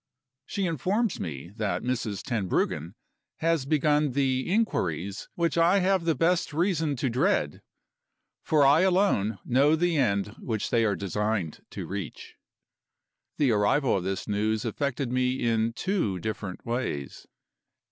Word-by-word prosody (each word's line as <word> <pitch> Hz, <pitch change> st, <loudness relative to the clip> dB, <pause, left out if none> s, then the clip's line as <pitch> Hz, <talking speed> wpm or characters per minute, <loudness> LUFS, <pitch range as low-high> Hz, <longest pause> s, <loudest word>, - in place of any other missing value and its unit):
She 200 Hz, -, -2 dB
informs 185 Hz, -, 0 dB
me 80 Hz, -1 st, -6 dB
that 105 Hz, -3 st, -1 dB
Mrs. 120 Hz, -5 st, -2 dB
Tenbruggen 95 Hz, -, -1 dB, 0.4 s
has 165 Hz, -4 st, 0 dB
begun 150 Hz, -1 st, +2 dB
the 130 Hz, +2 st, 0 dB
inquiries 100 Hz, -, -1 dB
which 170 Hz, -1 st, 0 dB
I 175 Hz, +4 st, +5 dB
have 190 Hz, -2 st, +2 dB
the 165 Hz, -2 st, +2 dB
best 165 Hz, -1 st, +1 dB
reason 160 Hz, -3 st, +1 dB
to 130 Hz, -, -1 dB
dread 140 Hz, -, 0 dB, 0.8 s
for 150 Hz, -3 st, +3 dB
I 145 Hz, +4 st, +6 dB
alone 180 Hz, -, +2 dB
know 140 Hz, +5 st, +4 dB
the 170 Hz, 0 st, +1 dB
end 100 Hz, -7 st, +1 dB
which 110 Hz, -4 st, -3 dB
they 115 Hz, -1 st, +3 dB
are 105 Hz, -2 st, +1 dB
designed 100 Hz, -3 st, -2 dB
to -, -, -6 dB
reach. 95 Hz, -4 st, -6 dB, 1.0 s
The 140 Hz, -5 st, +3 dB
arrival 110 Hz, +6 st, +2 dB
of 95 Hz, -, -1 dB
this 95 Hz, 0 st, -3 dB
news 105 Hz, +1 st, 0 dB
affected 135 Hz, +2 st, -2 dB
me 125 Hz, 0 st, +1 dB
in 115 Hz, -1 st, +1 dB
two 125 Hz, -, -1 dB
different 100 Hz, 0 st, -5 dB
ways. 115 Hz, -, -4 dB
130 Hz, 135 wpm, -27 LUFS, 105-165 Hz, 1.0 s, I